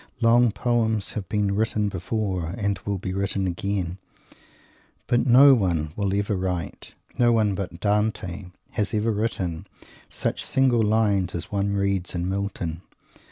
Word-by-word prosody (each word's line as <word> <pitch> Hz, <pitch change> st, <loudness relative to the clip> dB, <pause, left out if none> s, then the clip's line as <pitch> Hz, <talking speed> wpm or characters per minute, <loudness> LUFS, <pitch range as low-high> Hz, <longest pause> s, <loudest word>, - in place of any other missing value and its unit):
Long 120 Hz, 0 st, +4 dB
poems 110 Hz, -2 st, 0 dB
have 100 Hz, -5 st, -6 dB
been 105 Hz, -2 st, 0 dB
written 105 Hz, 0 st, 0 dB
before 95 Hz, -2 st, -3 dB
and 100 Hz, -3 st, -1 dB
will 100 Hz, -1 st, 0 dB
be 95 Hz, 0 st, -4 dB
written 100 Hz, 0 st, -1 dB
again, 95 Hz, 0 st, -2 dB, 1.1 s
but 120 Hz, +1 st, +1 dB
no 135 Hz, +3 st, +8 dB
one 85 Hz, -9 st, 0 dB
will 100 Hz, -2 st, -1 dB
ever 100 Hz, 0 st, 0 dB
write 90 Hz, -4 st, -4 dB, 0.2 s
no 120 Hz, -1 st, +5 dB
one 110 Hz, -3 st, +2 dB
but 95 Hz, -3 st, -5 dB
Dante 105 Hz, -3 st, -1 dB, 0.3 s
has 105 Hz, +1 st, -1 dB
ever 110 Hz, +2 st, +1 dB
written 100 Hz, -6 st, -2 dB, 0.4 s
such -, -, -3 dB
single 130 Hz, -3 st, +2 dB
lines 105 Hz, -4 st, +1 dB
as 85 Hz, -, -5 dB
one 100 Hz, 0 st, 0 dB
reads 100 Hz, -2 st, -1 dB
in 90 Hz, 0 st, -2 dB
Milton. 95 Hz, -4 st, -3 dB
100 Hz, 145 wpm, -24 LUFS, 95-110 Hz, 1.1 s, no